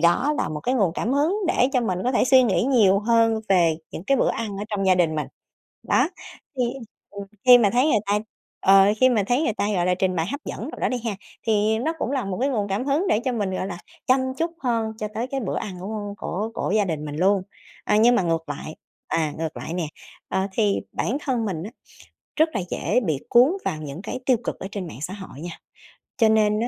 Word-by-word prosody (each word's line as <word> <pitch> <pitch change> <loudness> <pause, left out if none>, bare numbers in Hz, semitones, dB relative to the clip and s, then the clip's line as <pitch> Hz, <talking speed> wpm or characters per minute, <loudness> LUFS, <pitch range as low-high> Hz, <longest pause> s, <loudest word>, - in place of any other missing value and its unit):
đó 175 - +3
là - - 0
một 150 -1 -5
cái 250 - 0
nguồn 195 -9 +2
cảm 240 - -1
hứng 300 +8 +2
để 255 -6 +3
cho 255 - +3
mình 185 -6 -1
có 255 - +1
thể 250 - +3
suy 260 0 +6
nghĩ 220 -4 +2
nhiều 215 -8 +4
hơn 225 0 +2
về 170 -4 +4
những 170 - -7
cái 275 - +2
bữa - - +2
ăn 215 -3 -4
ở 205 - -4
trong 195 -2 -1
gia 185 - +5
đình 165 -3 +2
mình. 150 - -2 0.6
Đó, - - +3 0.5
thì, 250 - +3 0.5
ừm, 200 0 -7 0.2
khi 250 -1 +9
mà 205 -4 +3
thấy 250 +4 +3
người 305 - +3
ta 205 +1 +2 0.4
ờ, 195 0 +6 0.2
khi 255 - +7
mà 225 -5 +2
thấy 245 +6 +2
người 230 - +1
ta, 205 - -1
gọi 175 -1 +1
là, 180 - +3
trình 185 -1 0
bày 165 +1 0
hấp 285 +8 -4
dẫn - - -5
đồ - - -9
đó - - +1
đi 250 - -2
ha, 210 -4 -2 0.3
thì 220 0 +2
nó 315 +7 -1
cũng 260 - -2
là 265 -5 -1
một 190 -2 -4
cái 275 - +2
nguồn 210 -6 -1
cảm 200 +6 -1
hứng 295 +7 +1
để 225 - +2
cho 255 - 0
mình, 205 -5 -1
gọi 185 0 -2
là, 175 -3 -6 0.3
chăm 260 +1 +4 0.2
chút 330 +4 -1
hơn 230 -3 0
cho 215 - -3
tới 235 +3 -2
cái 270 0 -3
bữa 210 - -3
ăn 185 -3 -5
của 205 +1 -5
của 210 +5 -3
của - - -2
gia 205 - +3
đình 155 -4 -3
mình 145 0 -6
luôn. 195 +3 +3 0.4
À, - - +2
nhưng 235 +3 +5
mà - - +2
ngược 165 -2 -1
lại, 145 +2 -6 0.3
à, 155 -3 0
ngược 160 -1 -4
lại 165 - -5
nè, 175 -3 -1 0.4
ờ, 190 +1 0
thì 205 -1 +1
bản 250 - -1
thân 250 -6 -1
mình 175 -6 -3
á 210 - -6 0.7
rất 315 +1 +3
là 195 - 0
dễ - - 0
bị 150 -5 0
cuốn 250 +6 +6
vào 155 - -1
những 150 +4 -7
cái 220 +4 -5
tiêu 255 -3 +4
cực - - -4
ở - - -5
trên 190 -4 -5
mạng 140 - -10
xã 185 +4 -4
hội 190 -8 -10
nha, 170 -1 -7 0.6
cho 225 -3 +4
nên 215 -1 +3
á, 235 - 0
210 Hz, 255 wpm, -23 LUFS, 185-245 Hz, 0.7 s, khi